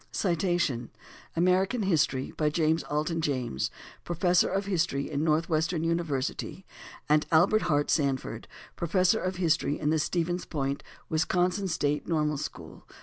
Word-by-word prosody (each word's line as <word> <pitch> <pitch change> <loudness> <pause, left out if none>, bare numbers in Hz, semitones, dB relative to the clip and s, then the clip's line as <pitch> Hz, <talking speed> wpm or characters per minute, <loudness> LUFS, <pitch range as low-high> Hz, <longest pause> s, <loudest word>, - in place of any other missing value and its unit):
["American 185 +6 +2
History." 145 -8 +1
By 150 -1 +1
James 160 +1 +1
Alton 155 +3 -1
James, 130 - -1 0.3
Professor 175 +1 +2
of 195 +1 -1
History 170 -7 -1
in 145 0 -1
Northwestern 160 +1 +1
University, 165 +1 -2 0.4
and 150 0 +3
Albert 180 +7 +5
Hart 145 -2 +2
Sanford, 140 -4 -1 0.3
Professor 185 +5 +2
of 185 0 -2
History 165 -4 +1
in 150 0 +1
the 160 - +2
Stevens 175 +3 -1
Point, 140 -2 -2 0.3
Wisconsin 180 +4 +1
State 150 -4 -1
Normal 150 -3 0
School. - - -8
160 Hz, 125 wpm, -28 LUFS, 150-180 Hz, 0.4 s, Albert